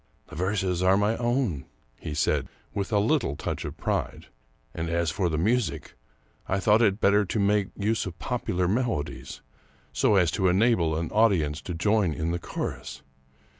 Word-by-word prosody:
" - - -39
The - - -10
verses 95 0 -1
are 95 +1 +4
my 105 +2 +2
own," 120 - -1 0.3
he 75 - -6
said, - - +1 0.3
with 100 +1 -3
a 105 - +3
little 105 - +1
touch - - -4
of - - -6
pride; - - -3 0.2
" - - -38
and 80 0 -3
as 85 -1 0
for 90 +2 0
the 80 - -1
music, 110 +4 0 0.6
I 95 - +1
thought 105 +3 +4
it 105 -2 +3
better 105 0 +4
to 105 - -2
make 100 0 +2
use 105 0 0
of 90 -2 -8
popular 90 -8 -1
melodies, 105 - -2 0.5
so 105 - +3
as 90 -5 +3
to 95 - +1
enable 90 -4 +2
an 80 0 -3
audience 90 -9 +2
to 90 - -5
join 100 -1 +2
in 80 +3 -2
the 85 - -2
chorus. - - -6
95 Hz, 180 wpm, -26 LUFS, 85-105 Hz, 0.6 s, are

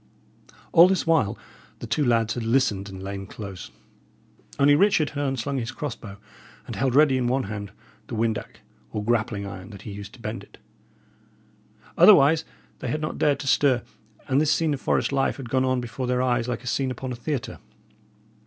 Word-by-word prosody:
All 170 +1 +8
this 190 -1 0
while 160 -11 +2 0.4
the - - -7
two 150 - 0
lads 115 -3 +2
had 120 - -4
listened 115 -5 +1
and 95 -1 -9
lain 95 0 -6
close; 100 -4 -8 0.9
only 140 +1 +5
Richard 180 -1 +3
had 145 0 -3
unslung 135 0 -2
his 115 -1 -4
cross 145 -5 -5
bow, 100 -2 -11 0.5
and - - -6
held 130 -2 0
ready 140 -3 +5
in 125 - 0
one 130 +2 +1
hand 100 -1 -6 0.4
the - - -5
windac, 110 -1 -2 0.3
or 105 -1 -4
grappling 110 -3 0
iron 95 0 -8
that 100 -2 -11
he 105 - -7
used 100 +1 -9
to - - -15
bend 115 0 -5
it. - - -18 1.4
Otherwise 150 +4 +7 0.4
they - - -5
had 150 +6 -1
not 155 - -4
dared 145 -2 +2
to 140 - -6
stir; 135 -3 +3 0.4
and 135 +2 +2
this 155 -1 +2
scene 160 -1 +2
of 135 - -5
forest - - +1
life 135 -1 0
had 125 -5 -8
gone 130 0 +2
on 130 -1 +1
before 125 +1 -4
their 125 0 +1
eyes 120 -2 +1
like 125 0 -3
a - - -13
scene 130 +2 0
upon 130 +1 -5
a - - -3
theatre. 130 +1 -4
125 Hz, 195 wpm, -25 LUFS, 110-140 Hz, 1.4 s, All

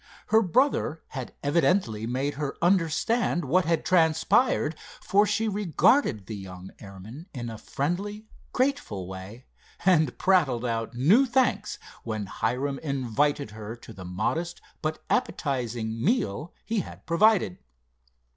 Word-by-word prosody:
Her 220 0 +5
brother 195 - +1
had 130 -3 -7
evidently 145 - +1
made 135 +4 -1
her 140 -1 -3
understand 175 +2 +1
what 180 +7 +2
had 165 0 0
transpired, 165 - +3 0.2
for 205 +2 +3
she 215 +2 0
regarded 200 - +2
the 110 - -6
young 95 -1 -9
airman 105 - -10
in 120 -2 -4
a 110 - -8
friendly, 200 +9 -3 0.3
grateful 255 - -1
way, 95 +6 -9 0.4
and 160 -8 +3
prattled 145 -11 +2
out 115 0 -2
new 195 - +5
thanks 240 -4 +1 0.3
when 110 -3 -3
Hiram 135 +7 -2
invited 140 -2 0
her 110 +1 -7
to 115 -1 -12
the 95 - -10
modest 130 - -2 0.2
but 155 0 -3
appetizing 115 -5 -1
meal 165 - 0
he 225 -1 0
had - - -8
provided. 180 - +3
145 Hz, 125 wpm, -27 LUFS, 115-190 Hz, 0.4 s, Her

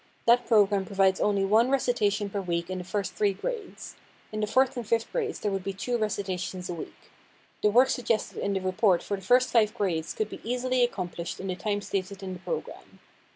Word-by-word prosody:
That 240 +1 +4
program 205 -3 +4
provides 190 -1 +2
only 200 -2 +2
one 220 +5 +4
recitation 210 -6 +1
per 200 - -2
week 170 -1 -2
in 185 - -3
the - - -5
first 195 +2 -3
three 205 -2 +1
grades. 445 - -6 0.3
In 215 - -4
the 210 - 0
fourth 260 +4 +3
and 245 - -3
fifth 230 0 0
grades 435 -4 -2
there 205 - -1
would 195 -1 -2
be 195 - -3
two 240 +6 -2
recitations 190 -4 -2
a - - -3
week. 165 - -10 0.5
The 210 - +4
work 250 +5 +5
suggested 235 -3 -1
in 200 - -1
the 190 - -1
report 185 0 +2
for 200 - -2
the 195 - -9
first 250 +6 +3
five 220 -2 +3
grades 170 -7 -1
could 215 -1 -2
be - - -8
easily 250 +2 +1
accomplished 180 -7 -3
in 195 - -6
the 185 - -1
time 205 +2 -2
stated 195 0 -4
in 185 -1 -4
the 180 - -8
program. 465 - -6
205 Hz, 215 wpm, -27 LUFS, 190-235 Hz, 0.5 s, work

